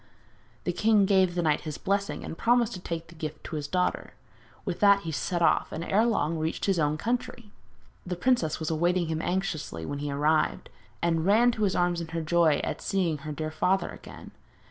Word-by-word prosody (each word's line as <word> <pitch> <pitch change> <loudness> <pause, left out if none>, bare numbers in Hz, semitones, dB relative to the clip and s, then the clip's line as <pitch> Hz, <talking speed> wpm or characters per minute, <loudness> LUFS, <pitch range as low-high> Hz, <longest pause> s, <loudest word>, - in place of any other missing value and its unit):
The 180 - -1
king 210 +1 +4
gave 190 -3 +3
the 175 - 0
knight 150 -2 +2
his 155 -2 -6
blessing, 200 +1 -2
and - - -6
promised 235 +3 +2
to 185 - -6
take 165 -2 -5
the - - -12
gift 155 -2 -6
to 165 - -6
his 145 -2 -3
daughter. 180 +4 -1 0.5
With - - -3
that 200 -1 +5
he 165 - -5
set 170 +5 -1
off, - - +2
and 160 - -4
ere 215 +6 +2
long 165 -8 0
reached 160 +1 -2
his 195 -3 +1
own 150 0 +1
country. 235 +1 -3 0.5
The 180 0 -4
princess 175 -7 +1
was 160 0 -2
awaiting 175 +1 +1
him 160 0 -1
anxiously 165 - -3
when 145 - -4
he 145 0 -3
arrived, 150 +3 +1 0.3
and 165 -1 +1
ran 230 +4 +5
to 215 -2 0
his 190 - 0
arms 175 -1 +1
in 165 - -5
her 165 0 -3
joy 160 -2 +3
at - - -3
seeing 175 -6 0
her 150 +2 -6
dear 155 +1 -4
father 190 +4 +1
again. - - -11
170 Hz, 210 wpm, -27 LUFS, 155-195 Hz, 0.5 s, that